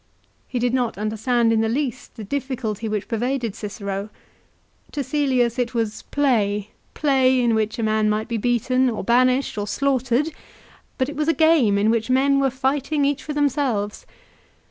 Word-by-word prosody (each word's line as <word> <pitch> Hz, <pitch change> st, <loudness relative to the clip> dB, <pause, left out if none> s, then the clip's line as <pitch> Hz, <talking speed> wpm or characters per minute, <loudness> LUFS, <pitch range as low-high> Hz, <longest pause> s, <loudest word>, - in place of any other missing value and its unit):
He 250 Hz, -, -4 dB
did 245 Hz, 0 st, 0 dB
not 245 Hz, -5 st, 0 dB
under 215 Hz, +1 st, -2 dB
stand 235 Hz, 0 st, +2 dB
in 220 Hz, -, +2 dB
the 225 Hz, -, +1 dB
least 260 Hz, 0 st, -3 dB
the 220 Hz, -, -7 dB
difficulty 230 Hz, -3 st, -3 dB
which 210 Hz, -1 st, -3 dB
pervaded 240 Hz, -1 st, -1 dB
Cicero. 200 Hz, -1 st, -5 dB, 0.8 s
To 290 Hz, -, -2 dB
Cselius 255 Hz, -4 st, +1 dB
it 245 Hz, 0 st, -1 dB
was 225 Hz, -2 st, -1 dB
play, 210 Hz, -8 st, +1 dB, 0.2 s
play 260 Hz, -3 st, +3 dB
in 240 Hz, -2 st, +2 dB
which 220 Hz, -1 st, 0 dB
a 230 Hz, -, -2 dB
man 215 Hz, 0 st, +2 dB
might 215 Hz, +1 st, -1 dB
be 230 Hz, -1 st, -2 dB
beaten, 250 Hz, +3 st, +1 dB
or 225 Hz, -, -4 dB
banished, 255 Hz, +1 st, +2 dB
or 205 Hz, -, -3 dB
slaughtered; 265 Hz, +4 st, 0 dB, 0.6 s
but 260 Hz, -, +1 dB
it 295 Hz, -, -6 dB
was 300 Hz, +1 st, -1 dB
a 330 Hz, -, +3 dB
game 300 Hz, -10 st, +4 dB
in 210 Hz, +2 st, +3 dB
which 230 Hz, +1 st, -1 dB
men 275 Hz, +2 st, +3 dB
were 275 Hz, -1 st, +2 dB
fighting 275 Hz, +3 st, 0 dB
each 285 Hz, 0 st, 0 dB
for 300 Hz, -, -5 dB
themselves. 270 Hz, -8 st, -1 dB
245 Hz, 175 wpm, -22 LUFS, 220-270 Hz, 0.8 s, game